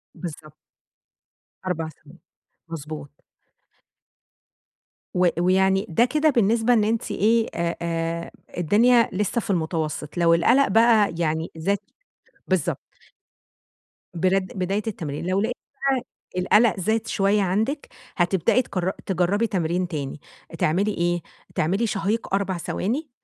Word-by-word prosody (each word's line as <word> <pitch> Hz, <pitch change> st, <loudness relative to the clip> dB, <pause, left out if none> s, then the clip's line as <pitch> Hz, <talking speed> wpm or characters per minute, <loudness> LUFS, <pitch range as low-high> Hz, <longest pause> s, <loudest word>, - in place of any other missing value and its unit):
بالضبط. 155 Hz, -3 st, -8 dB, 1.1 s
4 165 Hz, -3 st, -2 dB
ثواني، 160 Hz, +2 st, -18 dB, 0.5 s
مضبوط. 150 Hz, -2 st, -8 dB, 1.9 s
و 180 Hz, 0 st, +4 dB
ويعني 190 Hz, +2 st, +3 dB
ده 200 Hz, +9 st, +4 dB
كده 305 Hz, +4 st, +2 dB
بالنسبة 230 Hz, -1 st, +3 dB
إن 220 Hz, -, +4 dB
أنتِ 225 Hz, +2 st, -1 dB
إيه؟ 225 Hz, +2 st, +2 dB
آآ، 170 Hz, 0 st, -1 dB
آآ 165 Hz, 0 st, -2 dB, 0.3 s
الدنيا 230 Hz, +7 st, +4 dB
لسه 210 Hz, +4 st, 0 dB
في -, -, -10 dB
المتوسط، 160 Hz, -3 st, -2 dB
لو 170 Hz, -1 st, +4 dB
القلق 240 Hz, +12 st, +4 dB
بقى 220 Hz, -1 st, +4 dB
يعني 160 Hz, -1 st, -1 dB
زاد 195 Hz, +5 st, +1 dB, 0.7 s
بالضبط. -, -, 0 dB, 1.3 s
بر 185 Hz, +3 st, +2 dB
بداية 190 Hz, +2 st, -3 dB
التمرين، 160 Hz, -8 st, -4 dB
لو 190 Hz, +2 st, +2 dB
لقيتِ 235 Hz, +3 st, -1 dB, 0.3 s
بقى 260 Hz, -3 st, +1 dB, 0.4 s
القلق 210 Hz, +2 st, +4 dB
زاد 220 Hz, +3 st, 0 dB
شوية 205 Hz, 0 st, +2 dB
عندِك؛ 220 Hz, -, -1 dB, 0.3 s
هتبدئي 180 Hz, +6 st, +3 dB
تجر 185 Hz, -6 st, -2 dB
تجربي 190 Hz, +4 st, +1 dB
تمرين 180 Hz, -2 st, -1 dB
تاني. 145 Hz, -3 st, -5 dB, 0.4 s
تعملي 190 Hz, +7 st, +2 dB
إيه؟ 175 Hz, -1 st, 0 dB, 0.3 s
تعملي 195 Hz, +9 st, +1 dB
شهيق 210 Hz, +1 st, -2 dB
4 195 Hz, -2 st, 0 dB
ثواني، 255 Hz, -, -2 dB
190 Hz, 115 wpm, -24 LUFS, 170-220 Hz, 1.9 s, و